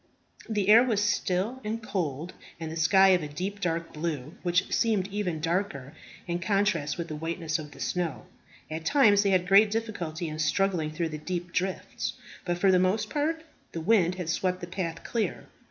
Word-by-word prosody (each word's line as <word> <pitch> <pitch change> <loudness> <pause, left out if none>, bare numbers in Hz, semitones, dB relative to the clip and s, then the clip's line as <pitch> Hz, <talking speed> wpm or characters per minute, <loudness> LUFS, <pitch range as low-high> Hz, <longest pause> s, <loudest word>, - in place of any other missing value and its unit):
The 205 -3 0
air 220 +2 +9
was 230 -5 +1
still 210 +4 0
and 215 +2 -2
cold, 170 -5 -3 0.3
and 160 -1 -5
the - - -5
sky 190 +4 +5
of 180 -2 +4
a 150 - -4
deep, 185 +7 -4
dark 170 -2 -2
blue, 150 -2 -4
which 175 0 +1
seemed 210 -5 +2
even 190 -5 -2
darker 165 -5 -2 0.3
in 170 0 -2
contrast 185 -5 +1
with 170 -1 -4
the 155 - -5
whiteness 165 +1 -2
of 150 -1 -7
the 140 - -15
snow. 170 +4 -2 0.5
At 160 +1 -4
times 205 - +5
they 200 - +2
had 185 -2 +2
great 200 +3 +6
difficulty 185 -7 -3
in 155 0 -6
struggling 175 -1 +1
through 160 +1 -2
the 155 -1 -6
deep 175 +2 -4
drifts; 185 0 -2 0.3
but 175 -1 -1
for 190 +2 +4
the 185 - +5
most 185 +4 +1
part 320 +2 -1 0.3
the 165 - -4
wind 180 -2 +3
had 180 -3 -5
swept 180 +2 0
the 175 - -5
path 175 -2 -4
clear. 230 -2 -2
180 Hz, 190 wpm, -28 LUFS, 160-200 Hz, 0.5 s, air